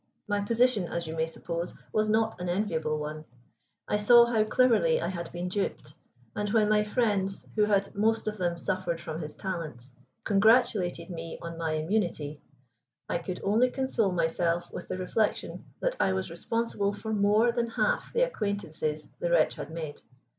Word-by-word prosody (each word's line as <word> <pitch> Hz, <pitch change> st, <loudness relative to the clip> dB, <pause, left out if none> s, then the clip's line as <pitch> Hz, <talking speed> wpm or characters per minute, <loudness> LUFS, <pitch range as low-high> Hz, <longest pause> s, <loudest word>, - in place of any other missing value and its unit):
My 205 Hz, -1 st, 0 dB
position, 230 Hz, -2 st, +2 dB
as 170 Hz, 0 st, -3 dB
you 160 Hz, 0 st, -5 dB
may 160 Hz, 0 st, 0 dB
suppose 170 Hz, +1 st, -5 dB, 0.2 s
was 215 Hz, 0 st, +2 dB
not 220 Hz, -3 st, +1 dB
an 180 Hz, -, -2 dB
enviable 170 Hz, -5 st, 0 dB
one. 150 Hz, +1 st, -5 dB, 0.6 s
I 210 Hz, -, +1 dB
saw 235 Hz, +3 st, +7 dB
how 230 Hz, -2 st, +2 dB
cleverly 255 Hz, -, +3 dB
I -, -, -1 dB
had 170 Hz, -3 st, -5 dB
been 175 Hz, +1 st, -4 dB
duped, 185 Hz, -6 st, -3 dB, 0.4 s
and 210 Hz, 0 st, -1 dB
when 215 Hz, 0 st, +3 dB
my 210 Hz, 0 st, +4 dB
friends, 205 Hz, -3 st, 0 dB
who 210 Hz, -1 st, +4 dB
had 200 Hz, -1 st, +1 dB
most 220 Hz, +2 st, +1 dB
of 215 Hz, 0 st, -2 dB
them, 175 Hz, -1 st, 0 dB
suffered 170 Hz, -1 st, -2 dB
from 165 Hz, -1 st, -5 dB
his 150 Hz, -1 st, -7 dB
talents, 155 Hz, -, -5 dB, 0.3 s
congratulated 200 Hz, -5 st, +3 dB
me 165 Hz, -1 st, -6 dB
on 170 Hz, 0 st, -6 dB
my 165 Hz, -1 st, -2 dB
immunity, 155 Hz, -3 st, -1 dB, 0.7 s
I 170 Hz, -, -1 dB
could 180 Hz, +1 st, -5 dB
only 225 Hz, +6 st, +3 dB
console 250 Hz, -6 st, 0 dB
myself 170 Hz, 0 st, 0 dB
with -, -, -6 dB
the -, -, -3 dB
reflection 205 Hz, +4 st, -1 dB, 0.2 s
that -, -, 0 dB
I 190 Hz, -, +3 dB
was 190 Hz, -2 st, -2 dB
responsible 205 Hz, +2 st, -1 dB
for 220 Hz, +1 st, -4 dB
more 210 Hz, +3 st, +4 dB
than 235 Hz, 0 st, -1 dB
half -, -, 0 dB
the 485 Hz, -, +3 dB
acquaintances 200 Hz, -, -2 dB
the 175 Hz, -, -1 dB
wretch 170 Hz, -2 st, +4 dB
had 145 Hz, -, -7 dB
made. 160 Hz, -2 st, -6 dB
195 Hz, 175 wpm, -29 LUFS, 170-220 Hz, 0.7 s, saw